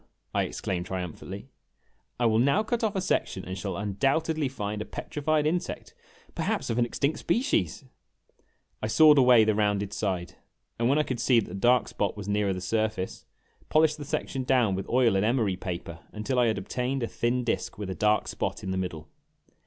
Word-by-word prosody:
I - - +2
exclaimed 90 -2 -3
triumphantly; 90 -3 -6 0.7
"I 120 - +2
will 110 -1 +3
now 140 - +3
cut 235 +1 -2
off 215 -2 0
a 190 - 0
section 95 - -1
and 95 - -5
shall 95 0 -4
undoubtedly 135 +10 0
find 105 -4 -4
a - - -4
petrified 150 0 -1
insect 170 +3 -2 0.4
perhaps - - -1
of 115 - 0
an 120 - +3
extinct 140 +5 -1
species! 170 - 0 1.0
I 110 - -1
sawed 150 +5 +6
away 125 -3 +7
the 110 0 +2
rounded 105 -1 0
side, 90 -5 -2 0.5
and 115 +1 +2
when 140 - +3
I 150 - +3
could 130 -5 -4
see 125 -3 +4
that 110 - -4
the - - -8
dark 120 +5 +3
spot 100 0 -2
was 100 -1 -6
nearer 105 -1 +1
the 90 -1 -3
surface, 110 0 -2 0.4
polished 155 0 +3
the - - -5
section 135 -1 -3
down 125 -6 +3
with 95 0 -4
oil 120 -4 +3
and 95 - +2
emery 110 -4 +1
paper 85 -2 -6
until 125 +5 -1
I 120 - +4
had 110 - +1
obtained 125 +6 -2
a - - 0
thin 120 +2 -1
disk 120 - -2
with 100 -2 -4
a - - -1
dark 105 +4 +2
spot - - -3
in 95 - -3
the 95 - -1
middle. 80 -5 -5
110 Hz, 195 wpm, -27 LUFS, 100-135 Hz, 1.0 s, away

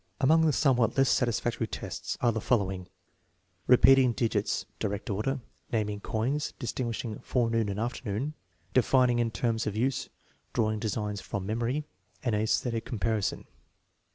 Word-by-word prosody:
Among 160 +4 +5
the - - +4
somewhat 125 -6 +2
less 135 -2 +4
satisfactory 120 -1 0
tests - - -5
are 120 - +4
the 110 -1 -3
fol 125 - +3
lowing: 95 -3 -4 0.8
repeating 130 0 +6
digits 110 -3 0
(direct 105 +2 -2
order), 125 +7 -1 0.3
naming 105 -3 -1
coins, 125 +9 -1
dis 120 -6 -4
tinguishing 115 -3 -3
forenoon 115 -3 +1
and 100 +1 -3
afternoon, 120 +3 -2 0.4
defining 125 -1 +4
in 120 -1 +2
terms 115 -1 -1
of 105 - -2
use, 125 +4 0 0.4
drawing 110 -1 +1
designs 105 -2 -2
from 100 0 -4
memory, 120 +7 -1 0.4
and 120 - 0
aesthetic 110 +2 0
compari 110 -2 -1
son. - - -2
115 Hz, 145 wpm, -29 LUFS, 105-125 Hz, 0.8 s, repeating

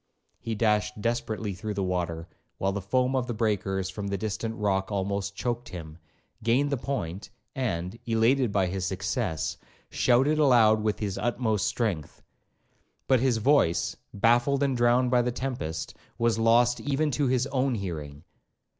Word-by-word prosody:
He 115 - -4
dashed 105 -1 +1
desperately 110 -2 -2
through 105 +3 -5
the 100 - -1
water, 85 -2 -2 0.3
while 95 - 0
the 100 +1 -3
foam 125 +6 +1
of 125 -2 0
the 120 - -3
breakers 95 -4 0
from 100 +2 -5
a 100 - 0
distant 110 +2 -3
rock 100 -2 0
almost 100 0 -2
choaked 120 +2 -3
him, 80 -2 -9 0.4
gained 125 +6 +2
the 140 - +1
point, 100 -8 -4 0.2
and, 105 -5 -3
elated 115 +2 +3
by 100 -2 +2
his 95 +1 -3
success, 95 -4 -2 0.3
shouted 135 +5 +3
aloud 115 -7 +5
with 105 -1 0
his 100 -3 -3
utmost 115 -5 0
strength. 100 - -2 0.8
But 130 -2 +4
his 125 -2 +2
voice, 110 - +2 0.2
baffled 120 +6 +3
and 135 -2 +1
drowned 120 +1 +3
by 125 -1 +4
the 125 +1 -1
tempest, 85 - -4 0.2
was 115 -1 +1
lost 120 +2 +4
even 145 +1 0
to 140 +2 +1
his 125 0 +2
own 135 -1 0
hearing. 80 -7 -6
110 Hz, 155 wpm, -27 LUFS, 95-125 Hz, 0.8 s, aloud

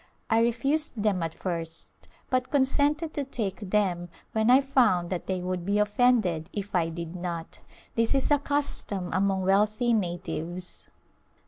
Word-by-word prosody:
I 225 - +5
refused 240 +1 0
them 200 -4 +1
at 165 -1 -3
first 165 -3 -5 0.4
but 255 0 +1
consented 290 +3 +1
to 290 - -2
take 205 -7 -4
them 185 -4 0 0.2
when 220 +1 +1
I 255 +2 +8
found 245 -11 +2
that 180 - -3
they 185 -1 -1
would 180 -1 -2
be 200 +3 0
offended 210 -6 +2
if 205 -1 -5
I 170 -2 +2
did 170 +1 -6
not. 175 -2 -5 0.3
This 230 +3 +1
is 270 +2 +2
a 290 - +5
custom 275 -10 0
among 190 0 +1
wealthy 210 +5 +2
natives. 175 -2 -3
205 Hz, 150 wpm, -27 LUFS, 180-250 Hz, 0.4 s, I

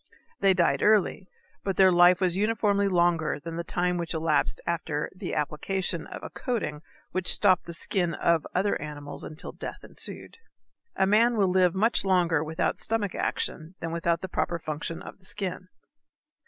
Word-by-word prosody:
They 195 -1 +4
died 175 -2 +2
early, 205 -2 +2 0.3
but 195 -1 -1
their 190 -1 +7
life 175 +1 +6
was 180 -2 +2
uniformly 205 -1 +2
longer 170 -5 +2
than 165 +2 -7
the 170 - -3
time 180 +1 0
which 170 -1 -3
elapsed 155 -2 +1
after 160 -3 -2
the - - -4
application 170 +3 -2
of - - -9
a - - -7
coating 180 -5 -3 0.3
which 185 -1 +2
stopped 185 -3 +4
the 170 - -6
skin 175 -1 0
of 170 -2 +1
other 195 +3 +1
animals 145 -1 -7
until 155 +1 -8
death - - -8
ensued. 460 - -7 0.6
A 190 - +3
man 225 +4 +4
will 195 -3 +3
live 180 -1 +3
much 220 +5 +2
longer 175 -5 +2
without 160 +1 -1
stomach 215 -4 -1
action 165 +2 -3
than 165 - -4
without 170 0 0
the 190 - -4
proper 175 - -1
functions 155 +1 -5
of - - -10
the 190 - -19
skin. 190 -2 -5
180 Hz, 170 wpm, -27 LUFS, 165-195 Hz, 0.6 s, their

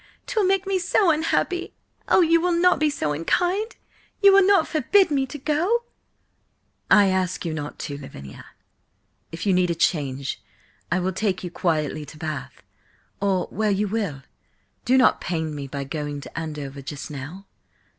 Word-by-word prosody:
'Twill 445 -6 +1
make 385 0 +2
me 385 -1 0
so 360 0 +3
unhappy! 330 +3 -1 0.3
Oh, - - +5
you 335 -1 +4
will 350 -1 +1
not 360 +1 +4
be 305 0 +3
so 155 - -2
unkind? 360 - 0 0.4
You 400 -1 +7
will 395 - +7
not 385 -3 +4
forbid 345 +4 +3
me 270 -2 +1
to 295 - -7
go?" 330 - +1 1.1
"I 205 -2 +6
ask 185 -1 -1
you 165 - -2
not 150 -1 -5
to, 145 -1 -6
Lavinia. 70 - -10 0.9
If 165 +4 -6
you 195 - +3
need 180 -1 +2
a 170 - 0
change, 140 -5 -1 0.5
I 185 - +2
will 185 +1 -1
take 190 -1 -1
you 175 - -5
quietly 155 -4 -1
to 155 - -12
Bath, 150 -5 -6 0.6
or 195 -2 +1
where 215 +2 0
you 205 +1 +1
will. 195 -10 -3 0.6
Do 260 +2 +4
not 260 - +4
pain 160 -3 -2
me 140 -2 -5
by 140 +1 -4
going 145 +1 -4
to - - -12
Andover 150 -4 -5
just 140 +2 -7
now." 150 +8 -8
190 Hz, 170 wpm, -24 LUFS, -, 1.1 s, You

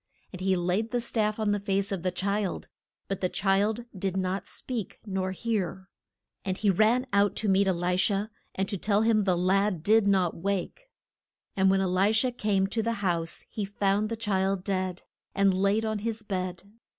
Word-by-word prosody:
And 185 - -8
he 190 0 +2
laid 180 +5 0
the 245 - 0
staff 215 -3 0
on 215 -2 +1
the 205 - +1
face 200 0 -1
of 195 -3 -2
the 185 - 0
child, 200 +2 -2 0.4
but 195 - -3
the 185 - +1
child 205 +5 +1
did 190 0 -2
not 185 +1 -2
speak 235 -7 -5
nor 190 -2 -2
hear. 190 -2 -3 0.5
And 190 -1 -2
he 205 -2 +3
ran 220 +7 +3
out 200 0 +3
to 220 - -1
meet 195 0 +3
E - - +4
li 180 0 0
sha 195 +2 +1 0.3
and 195 0 -1
to 200 -3 -3
tell 205 +2 +2
him 220 -2 +3
the 185 -3 +2
lad 185 -1 +1
did 215 +1 +4
not 190 -4 +2
wake. 200 - -3 0.7
And 190 -1 +4
when 195 0 +3
E - - +1
li 185 +3 +2
sha 250 +3 +2
came 210 -5 +1
to 220 +3 -1
the 230 +1 0
house 170 -2 -1
he 215 - -4
found 200 +1 0
the 230 - -2
child 195 -3 0
dead, 185 -2 -2 0.3
and 195 -1 +4
laid 200 +4 +2
on 220 -1 -1
his 225 +1 -3
bed. 185 -3 -3
195 Hz, 200 wpm, -28 LUFS, 185-215 Hz, 0.7 s, E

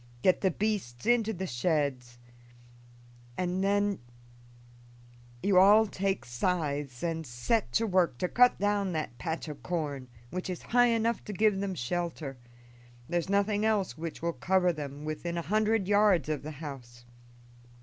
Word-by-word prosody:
Get 185 - +4
the 190 - +3
beasts 190 - -2
into 230 -2 +3
the 190 -2 -4
sheds, 130 -4 -1 1.2
and 185 +1 -1
then 205 0 +1 1.4
do - - -1
you 190 -2 +6
all 210 +4 +7
take 195 -1 -2
scythes 140 -1 -2
and 165 -1 -1
set 120 - -1
to 225 - +2
work 180 - +2
to 180 - -1
cut 250 +6 +4
down 205 -2 0
that 155 -7 -4
patch 160 +5 -3
of 145 -3 -8
corn, 145 -5 -3 0.2
which 185 +1 -4
is 180 - -5
high 245 +1 +4
enough 230 0 +1
to 210 - -5
give 210 0 +2
them 195 -1 -2
shelter; 155 -1 -3 0.7
there's 175 +1 -1
nothing 205 +1 +1
else 210 - +1
which 165 +1 -6
will 170 0 0
cover 180 +6 +2
them 145 -1 -7
within 170 +3 -4
a 170 - -2
hundred 215 +1 +1
yards 205 -7 +3
of 155 -2 -1
the 150 - -7
house. 125 -5 -9
180 Hz, 155 wpm, -29 LUFS, 145-205 Hz, 1.4 s, all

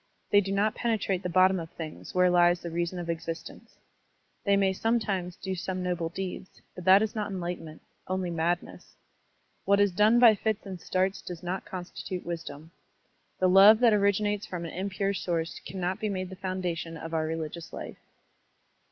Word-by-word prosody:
They 205 - +6
do 195 0 -4
not 205 +2 +2
penetrate 210 -6 -1
the 180 - -3
bottom 185 +1 +4
of 165 -1 -7
things 160 +1 -8
where 180 0 +4
lies 175 0 +4
the 170 - -6
reason 170 +2 -2
of 175 -1 -5
existence. 165 0 -6 0.7
They 200 -1 +3
may 195 -1 +2
sometimes 195 -5 -1
do 190 - -4
some 185 0 -3
noble 175 -2 -1
deeds, 185 +1 -6
but 180 - -9
that 190 +2 +7
is 220 - -2
not 210 -2 -3
enlightenment, 175 -4 -6 0.2
only 185 -1 -2
madness. 170 +1 -3 0.7
What 200 0 +3
is 205 -1 +4
done 210 +5 +4
by 240 -2 +8
fits 215 +1 -2
and 185 -3 -7
starts 190 +1 0
does 175 -2 -8
not 180 +2 -3
constitute 180 0 -6
wisdom. 165 -2 -6 0.7
The 185 - +3
love 195 +4 +8
that 235 -3 +6
originates 205 0 +1
from 175 -2 -5
an 165 - -6
impure 195 +1 -1
source 170 -3 -2
cannot 185 +1 -3
be 215 - -1
made 185 -1 -3
the - - -7
foundation 180 -3 -4
of 165 0 -7
our 160 -1 0
religious 160 +1 -5
Ufe. - - -8
185 Hz, 180 wpm, -28 LUFS, 175-200 Hz, 0.7 s, by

